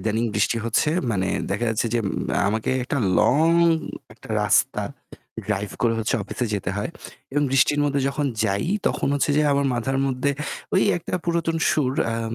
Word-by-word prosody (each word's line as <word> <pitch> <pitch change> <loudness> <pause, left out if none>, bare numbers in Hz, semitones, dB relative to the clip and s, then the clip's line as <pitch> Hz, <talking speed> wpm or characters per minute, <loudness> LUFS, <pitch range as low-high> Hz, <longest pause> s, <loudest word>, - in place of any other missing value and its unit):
ইদানিং 110 +2 0
বৃষ্টি 105 +3 +1
হচ্ছে 115 +6 +1 0.2
মানে 95 -3 0 0.2
দেখা 105 +4 -1
যাচ্ছে 110 +1 0
যে 120 - +3 0.5
আমাকে 110 +3 -1
একটা 140 - -2 0.2
লং 155 +5 +4 0.6
একটা - - -16
রাস্তা - - +2 0.6
ড্রাইভ 105 -1 -2
করে 115 -1 +3 0.3
অফিসে 120 +4 -3
যেতে 95 -2 -2
হয়। 105 +9 -2 0.4
এবং 145 0 +1
বৃষ্টির 140 +2 +3
মধ্যে 140 -1 +1
যখন 145 +1 -1 0.2
যাই 100 +6 0 0.2
তখন - - 0
হচ্ছে 145 +1 +1
যে 150 - +4
আমার 140 0 +1
মাথার 135 +3 -1
মধ্যে 135 +2 0 0.4
ওই 190 - +4 0.2
একটা 170 - -5
পুরাতন 170 -1 0
সুর 130 -4 +1 0.2
আম 115 0 -3
125 Hz, 160 wpm, -23 LUFS, 110-145 Hz, 0.6 s, লং